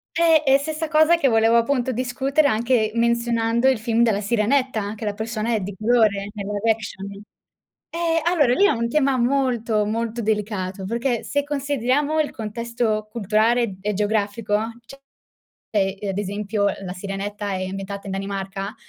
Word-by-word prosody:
Eh! 325 -2 +4
E 270 0 +5
stessa 315 +2 -3
cosa, 315 +2 +5
che 300 -5 +2
volevo 225 -1 +4
appunto 250 +2 +1
discutere 265 +4 +1
anche 230 -2 +1
menzionando 235 0 +1
il 260 -4 +3
film 230 +1 +1
della 210 -3 +2
Sirenetta, 235 +4 +1
anche 210 +2 -5
la 205 -1 -2
persona 220 +1 -2
è - - +1
di 195 +1 -6
colore 215 -3 +2
nel 200 -2 -5
live 205 +2 -1
action. 210 -3 -2 0.9
Eh, 330 -1 +1
allora, 325 -8 +3
lì 395 - +3
è - - +5
un 235 0 -1
tema 275 -1 +2
molto, 240 -4 +1
molto 230 +2 -2
delicato, 205 -3 -2
perché 235 +3 -1
se 285 0 -1
consideriamo 285 +1 0
il 300 - -3
contesto 220 -1 -2
culturale 220 0 +1
e 210 +1 -1
geografico, 210 +1 0 0.3
cioè 275 - -12 1.1
ad 195 - -3
esempio 205 +1 -2 0.2
la 180 - -5
Sirenetta 200 +2 -5
è 185 0 -2
ambientata 195 +1 -6
in - - -4
Danimarca? 195 +1 -4
230 Hz, 155 wpm, -22 LUFS, 205-260 Hz, 1.1 s, E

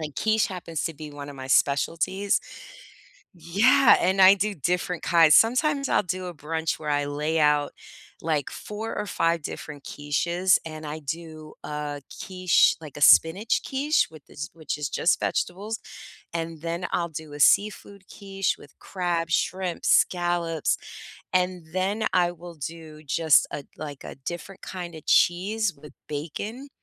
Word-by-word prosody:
And 150 -2 -5
quiche 220 0 +2
happens 170 -4 -5
to 165 - -3
be 150 0 -9
one 145 0 -8
of 140 - -9
my 130 0 -7
specialties 165 +9 +1 1.0
Yeah, 220 - +5
and 190 +2 +2
I 190 +1 +9
do 200 +1 -1
different 175 +1 -2
kinds. 165 -2 +6
Sometimes 275 +4 +3
I'll - - +3
do 185 0 -4
a 175 - -6
brunch 160 +1 -3
where 150 - -4
I 145 0 +1
lay 150 +3 -1
out, 150 -1 +3 0.5
like, 155 -3 -1
4 220 +2 -6
or 210 - -2
5 165 -4 0
different 145 -1 -7
quiches, 170 +6 +1
and 155 -1 -7
I 150 +1 -5
do 155 +1 -7
a 150 -1 -4 0.2
quiche, 185 -2 +3
like 150 -4 -10
a 145 - -8
spinach 185 +10 +5
quiche 290 +3 +1
with 155 -2 -15
this 145 +1 -7
which 160 -2 -4
is 150 -1 -2
just 175 - +2
vegetables. 205 +5 -2 0.6
And 165 -1 -4
then 170 +2 -3
I'll 170 -1 0
do 155 -2 -8
a 145 - -8
seafood 200 +2 +2
quiche 195 -1 -2
with 145 - -17
crab, 175 -3 -2
shrimp, 185 0 -1
scallops. 175 -3 +2 0.6
And 180 -1 +1
then 195 +4 -1
I 175 -1 +3
will 175 0 -11
do 155 0 -8
just 155 +2 +4
a, 145 - -6
like, 145 -3 -8
a - - -7
different 175 +4 -7
kinda 175 -3 -7
cheese 200 +4 +2
with 150 +1 -13 0.2
bacon. 200 - -5
170 Hz, 155 wpm, -25 LUFS, 150-190 Hz, 1.0 s, I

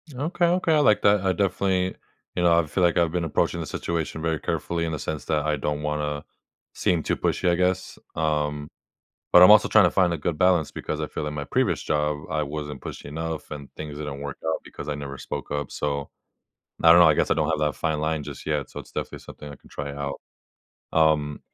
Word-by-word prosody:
Okay, 165 +6 0
okay, 175 -1 +2
I - - +4
like 110 -8 +4
that. 100 -1 +5
I 95 -1 +1
definitely 95 0 0 0.4
you 90 - 0
know, 85 -1 +5
I 80 - +1
feel 90 +4 0
like 85 0 +3
I've 85 -2 +3
been 90 -1 -1
approaching 80 - 0
the - - -3
situation 80 -1 -3
very 80 -2 -1
carefully 85 -1 -2
in 80 - -2
the 75 - -3
sense 75 -4 -4
that 75 -2 0
I 75 -1 +1
don't 75 +1 -2
wanna 75 -1 -2 0.5
seem 85 -3 0
too - - 0
pushy, 90 - 0
I 85 - +3
guess. 90 +1 -1 0.2
Um, 75 -2 -1 0.6
but 90 - +9
I'm 90 - +9
also 105 0 +7
trying - - +6
to - - +4
find 90 -3 +2
a 85 - -2
good 80 +1 -2
balance 90 -4 +3
because - - -4
I - - -1
feel - - -5
in 75 - -4
my 70 - -4
previous - - 0
job, 75 -1 0
I 75 - 0
wasn't 75 -1 -5
pushy - - -8
enough 80 +2 -5
and 70 -2 -7
things 75 -2 -7
didn't 75 -2 -5
work 70 -1 -6
out 80 - 0
because - - -9
I 75 - -1
never 70 -1 -6
spoke - - -6
up. 75 -1 -3
So, 70 -1 -3 0.7
I 80 - +7
don't 85 - +7
know, 85 - +8
I 75 - +4
guess - - +1
I - - +5
don't - - 0
have - - 0
that 75 - -1
fine 80 -1 -1
line 80 0 -1
just - - -8
yet, 75 -3 -1
so - - -7
it's - - -15
definitely - - -5
something 75 - -11
I 70 - -10
can - - -21
try 70 0 -5
out. 70 -1 -5 0.7
Um 75 -2 +2
80 Hz, 235 wpm, -25 LUFS, 75-85 Hz, 0.7 s, but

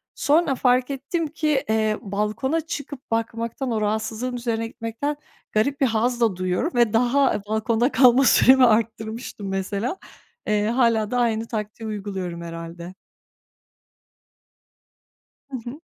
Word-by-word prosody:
Sonra 295 -2 +2
fark 250 0 +2
ettim 310 +5 -2
ki, 300 -2 0
eee, 215 -1 +1
balkona 210 +10 -1
çıkıp 285 -5 -7
bakmaktan, 230 +3 -2
o 220 -2 -1
rahatsızlığın 220 +4 -2
üzerine 230 -2 -2
gitmekten 230 +6 -4 0.4
garip 275 +7 0
bir - - +5
haz 240 +1 0
da 225 -5 +3
duyuyorum 185 - -1
ve 235 -3 +3
daha 250 +1 +2
balkonda 220 +4 +1
kalma 255 +2 +6
süremi 260 0 +6
arttırmıştım 220 -1 -1
mesela. 200 - -2 0.5
Eee, 210 0 +1
hâlâ 230 -3 +2
da 250 - 0
aynı 225 -1 0
taktiği 215 0 -5
uyguluyorum 195 -5 -5
herhâlde. 170 +1 -8 2.5
Hı 270 - -4
hı. 290 +6 -10
230 Hz, 125 wpm, -23 LUFS, 215-260 Hz, 2.5 s, kalma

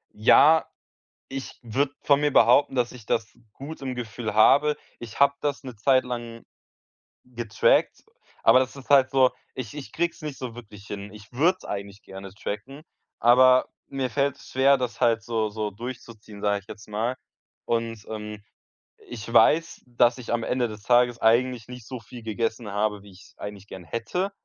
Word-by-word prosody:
Ja, 150 +9 +5 0.6
ich 135 0 -7
würde 135 +5 -1
von 140 -1 +3
mir 150 0 +2
behaupten, 125 +4 +5
dass 120 -1 0
ich 120 -4 -13
das 110 -2 -1 0.2
gut 145 +2 -9
im 130 -2 -4
Gefühl 115 -2 -5
habe. 145 +7 +5 0.2
Ich 120 +3 -7
habe 140 0 +6
das 145 -1 -2
'ne 125 -5 -9
Zeit 130 +4 +3
lang 120 -2 -6 0.8
getrackt, 120 -4 +1 0.4
aber 130 - +6
das 130 +2 -1
ist 135 +1 -13
halt 135 -2 +6
so 130 -1 +4 0.2
ich 125 -5 -6
ich 145 -2 -8
krieg's 170 +1 -2
nicht 150 -3 -6
so 125 -3 -7
wirklich 105 -4 -12
hin. 100 0 -7
Ich 105 +2 -14
würd's 175 +9 +1
eigentlich 100 +1 -6
gerne 95 0 -10
tracken, 125 +9 -6 0.4
aber 125 +2 +6 0.2
mir 135 -3 -3
fällt's 140 0 -2
schwer, 135 +1 +4
das 125 -2 -4
halt 115 -1 +3
so 115 -2 -1
so 105 0 -4
durchzuziehen, 115 -2 -9
sage 100 -1 +1
ich 100 - -27
jetzt 110 0 -11
mal. 115 +4 -2 0.5
Und, 115 -2 -2
ähm, 105 -1 -7 0.7
ich 115 -1 -8
weiß, 165 +9 +4
dass 120 0 +2
ich 120 - -8
am 115 -1 0
Ende 125 -1 0
des 105 -1 -10
Tages 120 +1 +3
eigentlich 120 +1 +2
nicht 125 -3 -10
so 130 -2 -7
viel 120 +2 -12
gegessen 110 0 -3
habe, 105 0 -1
wie 100 - -15
ich's 90 - -18
eigentlich 100 -1 -8
gern 95 -2 -9
hätte. 115 - -3
120 Hz, 175 wpm, -25 LUFS, 110-130 Hz, 0.8 s, habe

